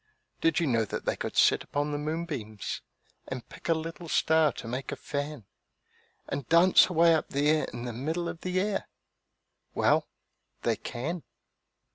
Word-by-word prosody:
Did 165 +1 +3
you 170 - +1
know 115 -5 +2
that 105 - -5
they - - +1
could - - -5
sit - - +5
upon 145 +1 -2
the 145 - -2
moonbeams 150 - -4 0.5
And 130 -2 -6
pick - - -9
a 165 - +5
little 165 +1 -6
star 160 -1 +4
to - - -8
make 130 +3 -4
a - - -2
fan, 145 -5 -4 0.8
And 140 - -4
dance 175 +3 +6
away 170 -1 +5
up 160 - 0
there 150 +2 +2
in 120 - -7
the 120 - -4
middle 160 +8 -2
of 165 - -6
the 185 0 0
air? 200 +1 -1 0.9
Well, - - +3 0.6
they - - +2
can. 160 +9 -4
155 Hz, 165 wpm, -29 LUFS, 135-165 Hz, 0.9 s, dance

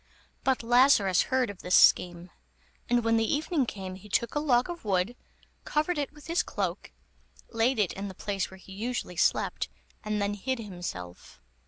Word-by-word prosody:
But 265 -3 +1
Lazarus 235 -6 +5
heard 255 -4 +1
of 195 - -13
this 180 - +2
scheme, 175 0 +4 0.6
and 240 -1 +3
when 230 0 +3
the 225 0 +1
evening 300 -2 0
came, 190 -3 -6
he 195 +3 -12
took 235 +3 0
a 295 - 0
log 255 -5 +2
of 345 -1 -7
wood, 195 +2 0 0.5
covered 305 +2 0
it 285 - -2
with 300 -1 -16
his 335 +1 +1
cloak, - - -4 0.6
laid 230 +3 +2
it 205 -5 +1
in 195 +1 -5
the 190 - -8
place 200 -1 -2
where 190 - -12
he 190 - -15
usually 225 -2 -4
slept, - - +1 0.3
and 210 -1 -1
then 200 0 0
hid 260 +6 -2
himself. 175 - -8
220 Hz, 180 wpm, -28 LUFS, 190-260 Hz, 0.6 s, Lazarus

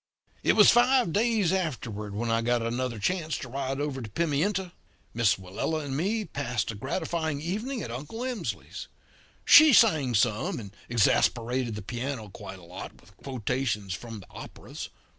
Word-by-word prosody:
"It - - +3
was 210 - +7
five 245 -6 +4
days 215 -5 +2
afterward 115 - -3
when 115 +2 -1
I 115 0 +2
got 120 0 +1
another 120 +1 -2
chance 160 - -1
to - - -7
ride 135 +1 -3
over 145 -2 -2
to 110 - -7
Pimienta. 170 - 0 0.4
Miss 110 -4 +3
Willella 100 - -3
and 135 -1 -4
me 205 +8 0
passed 120 - -2
a - - -8
gratifying 160 - -2
evening 215 - -3
at 115 - -6
Uncle 145 - -6
Emsley's. 250 -3 -4 0.6
She 310 -2 +9
sang 155 - +5
some, 110 +2 +1
and 100 -4 -9 0.2
exasperated 120 +1 +2
the 105 - -6
piano 120 0 -4
quite 95 -1 -9
a 90 - -15
lot 90 +2 -9
with 95 +3 -21
quotations 120 -6 -2
from 115 +1 -7
the 95 - -15
operas. - - -9
130 Hz, 160 wpm, -27 LUFS, 115-170 Hz, 0.6 s, She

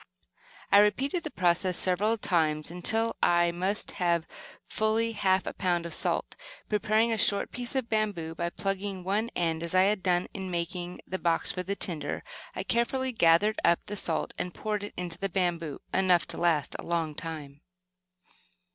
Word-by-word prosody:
I 200 - +8
repeated 270 - +2
the 310 - -5
process 180 - +1
several 205 +5 +2
times 155 -6 0
until 225 +6 +3
I 175 0 +4
must 185 +4 -2
have 170 -2 +1
had - - -29 0.4
fully 220 +1 +1
half 190 -3 +1
a - - -4
pound 175 -3 0
of 170 - -5
salt. - - -1 0.3
Preparing 215 +2 +2
a 225 - 0
short 200 - +2
piece 245 +2 -3
of 260 -3 0
bamboo 205 -8 -1
by 170 +1 -2
plugging 195 0 -3
one 205 +5 0
end 165 -2 0
as 170 +2 -3
I 185 - +6
had 200 0 +2
done 180 -1 +1
in 190 -2 -5
making 175 +1 -4
the 190 - -4
box 165 -1 +1
for 180 - -3
the 195 +2 -3
tinder, 170 -6 0 0.3
I - - -3
carefully 260 +3 0
gathered 205 0 +3
up 170 - +3
the 205 - -5
salt 165 -5 -1
and 180 - -3
poured 210 -2 -3
it 205 - -7
into 175 -2 -5
the 195 - -2
bamboo, 170 -5 -1
enough 185 -3 +3
to - - -3
last 165 -5 +1
a - - -6
long 165 -2 -1
time. 150 -3 -7
185 Hz, 180 wpm, -28 LUFS, 170-210 Hz, 0.4 s, I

